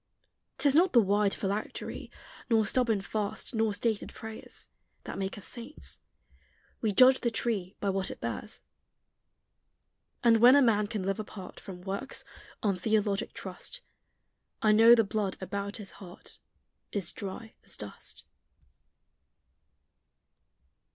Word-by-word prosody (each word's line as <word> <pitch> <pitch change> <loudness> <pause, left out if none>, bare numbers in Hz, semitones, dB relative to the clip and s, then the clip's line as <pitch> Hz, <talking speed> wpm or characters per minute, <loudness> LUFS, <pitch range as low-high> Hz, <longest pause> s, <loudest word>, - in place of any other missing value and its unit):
'Tis 285 -2 +4
not 350 +5 +4
the 240 - +8
wide 205 -1 +3
phylactery, 200 +2 -4 0.4
Nor 225 -2 +4
stubborn 225 -2 +2
fast, 205 +4 -3
nor 220 -1 +2
stated 215 +1 -1
prayers, 220 0 -8 0.4
That - - -6
make 195 +2 -3
us 205 - -7
saints: 85 - -6 0.8
we 220 - +1
judge 255 +5 +7
the 240 - +1
tree 215 -5 -2
By 200 - 0
what 190 0 -1
it - - -8
bears. - - -5 1.6
And 230 -1 +6
when 245 +4 +8
a 285 - +7
man 210 -3 +3
can 205 -2 -3
live 195 +3 -1
apart 200 -3 -8
From 180 -2 -9
works, 200 +7 -4 0.4
on 200 -3 +2
theologic 205 +1 0
trust, - - -6 0.8
I 215 - +4
know 225 +2 +8
the 225 - +4
blood 205 -1 -2
about 200 +1 -4
his 205 -4 -7
heart 185 0 -12 0.5
Is 195 -5 0
dry 205 +3 -7
as - - -8
dust. 105 -1 -8
210 Hz, 130 wpm, -30 LUFS, 195-230 Hz, 1.6 s, the